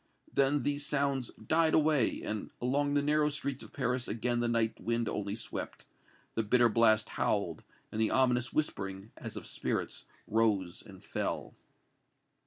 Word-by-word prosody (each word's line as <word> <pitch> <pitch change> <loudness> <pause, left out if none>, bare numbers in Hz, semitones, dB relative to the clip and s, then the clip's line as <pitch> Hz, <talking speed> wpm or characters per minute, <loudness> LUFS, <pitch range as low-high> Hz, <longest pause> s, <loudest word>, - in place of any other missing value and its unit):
Then 140 +1 +3
these 145 0 0
sounds 140 -4 0 0.2
died 160 0 +3
away, 150 -6 +3
and 105 -1 -3
along 145 +3 +1
the 145 - +3
narrow 150 +1 +3
streets 140 -2 -3
of - - -9
Paris 125 -1 -1
again 120 +1 0
the 120 - +1
night 115 -1 0
wind 115 0 0
only 100 0 -2
swept, 115 - -6 0.5
the 115 - +1
bitter 120 +2 +4
blast 110 -1 +4
howled 100 -6 0 0.3
and 110 - -1
the 110 - +3
ominous 125 -2 +2
whispering, 100 -8 -2
as - - -8
of - - -6
spirits, - - -3 0.2
rose 105 -5 +1
and 95 -4 -13
fell. - - -3
120 Hz, 155 wpm, -32 LUFS, 110-140 Hz, 0.5 s, bitter